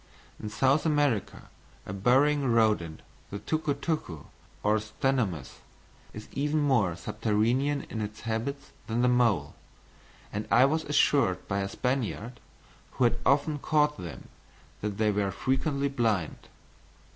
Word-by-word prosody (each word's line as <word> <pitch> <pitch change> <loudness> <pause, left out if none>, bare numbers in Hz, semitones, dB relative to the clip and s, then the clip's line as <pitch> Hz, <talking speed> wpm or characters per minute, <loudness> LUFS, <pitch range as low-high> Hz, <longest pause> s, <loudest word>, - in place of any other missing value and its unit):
In 105 - -4
South 135 +7 +2
America, 145 - 0 0.4
a 95 - -6
burrowing 135 +8 +3
rodent, 105 -9 +1 0.3
the 100 - -5
tuco 155 +5 -1
tuco, 140 - -3 0.4
or 105 +1 +3
Ctenomys, 110 - -2 0.5
is 105 0 -9
even 150 +2 -1
more 120 - +2
subterranean 115 +10 0
in 110 - -5
its 105 +1 -6
habits 120 +5 -4 0.2
than 115 +2 0
the - - +4
mole; 115 -12 +2 0.8
and 105 +1 -3
I 125 +2 +6
was 155 +3 0
assured 140 -9 +2
by 100 -1 -1
a 100 0 -2
Spaniard, 125 0 -2 0.5
who - - 0
had 120 0 +2
often 145 +2 +2
caught 150 0 +1
them, 85 - -8 0.5
that 105 -1 -3
they 110 -1 +2
were 100 -1 0
frequently 140 +5 0
blind. 115 - -1
120 Hz, 135 wpm, -28 LUFS, 105-140 Hz, 0.8 s, I